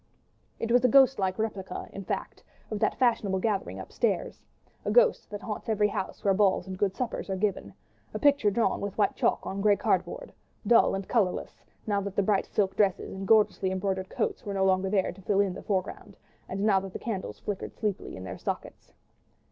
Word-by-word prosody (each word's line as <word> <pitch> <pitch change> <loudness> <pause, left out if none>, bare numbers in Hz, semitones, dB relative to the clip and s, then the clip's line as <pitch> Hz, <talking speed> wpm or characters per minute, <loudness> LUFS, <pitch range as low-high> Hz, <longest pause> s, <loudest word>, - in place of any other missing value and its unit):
It 230 - -3
was 245 +1 +5
a - - +6
ghostlike 250 -8 +4
replica, 200 -4 -4
in 195 - -7
fact, - - -4 0.3
of 215 - -2
that - - +1
fashionable 225 -6 +2
gathering 200 0 -1
upstairs; - - -2 0.4
a - - -2
ghost - - +4
that 205 0 -7
haunts 215 0 -5
every 210 -1 +2
house 190 - -5
where 195 - +4
balls 190 -2 +2
and 190 -1 -6
good 195 0 0
suppers 245 -4 -3
are 190 - 0
given; 200 +1 -1 0.4
a - - -4
picture 285 -7 +4
drawn 225 +3 0
with 200 -1 -4
white 205 -2 +2
chalk - - +1
on 195 +1 -3
grey 205 0 +5
cardboard, 185 -5 -1 0.3
dull 230 -1 +5
and 195 0 -5
colourless, 200 -7 -1 0.2
now 205 -2 0
that 200 -1 -5
the 200 - +2
bright 200 0 +1
silk 195 -2 0
dresses 200 -3 +1
and 195 0 -6
gorgeously 210 -3 +4
embroidered 190 0 -2
coats - - -2
were 200 -1 -4
no 190 0 +2
longer 190 0 +2
there 190 -2 +1
to 195 - -14
fill 195 +1 +1
in 200 -2 +2
the - - -8
foreground, 195 0 -3 0.3
and 195 +1 -3
now 200 -2 +4
that 190 -1 -8
the - - -3
candles 210 -5 -4
flickered 205 -2 -5
sleepily 210 -3 -3
in 95 - -8
their 90 -1 -7
sockets. - - -6
200 Hz, 205 wpm, -28 LUFS, 190-215 Hz, 0.4 s, a